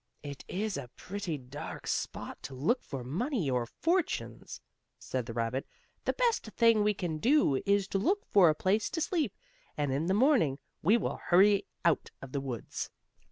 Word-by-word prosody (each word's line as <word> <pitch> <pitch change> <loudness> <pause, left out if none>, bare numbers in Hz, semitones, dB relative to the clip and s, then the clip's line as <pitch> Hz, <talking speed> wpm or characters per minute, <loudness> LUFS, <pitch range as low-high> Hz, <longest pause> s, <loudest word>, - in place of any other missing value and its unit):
"It 145 -1 -7
is 205 +1 -2
a 140 -3 -5
pretty 185 -5 -4
dark 130 +2 -8
spot - - -3
to 135 - -7
look 170 - +1
for 135 -3 -6
money, 175 - -1
or 125 -2 0
fortunes," 340 - -1 0.4
said 125 -2 -4
the 115 - -5
rabbit. 115 +3 -1 0.4
"The - - +2
best 480 -2 +1
thing 230 -2 +5
we 210 0 +2
can 170 -5 -3
do 245 - +3
is 200 -1 +3
to 195 - 0
look 395 - +1
for 185 -5 +6
a 155 - +2
place 200 +6 +1
to - - -3
sleep, 315 - 0 0.4
and 145 -3 0
in 150 +5 0
the 190 - +2
morning 225 - +4 0.2
we 205 +8 +5
will 230 - -2
hurry 195 +3 +5 0.2
out 170 -3 +2
of 135 - -10
the 140 - -2
woods." 125 -5 -5
180 Hz, 180 wpm, -31 LUFS, 135-220 Hz, 0.4 s, for